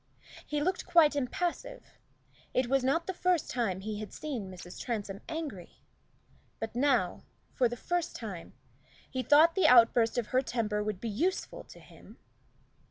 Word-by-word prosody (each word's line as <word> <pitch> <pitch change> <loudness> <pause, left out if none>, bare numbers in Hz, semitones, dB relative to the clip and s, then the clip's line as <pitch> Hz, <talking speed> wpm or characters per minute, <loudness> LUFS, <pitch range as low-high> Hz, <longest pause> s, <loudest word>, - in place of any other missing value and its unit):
He 295 -1 -1
looked 370 +3 -1
quite 335 -4 +5
impassive: 350 - -4 0.6
it 255 - +3
was 270 +1 +2
not 280 +6 +1
the 380 - -3
first 360 -2 0
time 210 -7 -1
he 210 +1 -4
had 215 -3 -7
seen 255 -11 -5
Mrs. 180 -1 -10
Transome 205 -5 -4
angry; 300 - -6 0.8
but 225 0 -5
now, 245 -9 +1 0.3
for 245 -2 +2
the 240 - -6
first 350 +6 -2
time, 195 -7 -7 0.5
he 260 - -3
thought 310 +5 +6
the 375 -5 +3
outburst 235 -2 +5
of 235 -3 -1
her 255 - +4
temper 220 -5 -1
would 210 -3 -3
be 230 - -5
useful 320 - -2
to - - -14
him. - - -16
250 Hz, 160 wpm, -30 LUFS, 215-315 Hz, 0.8 s, thought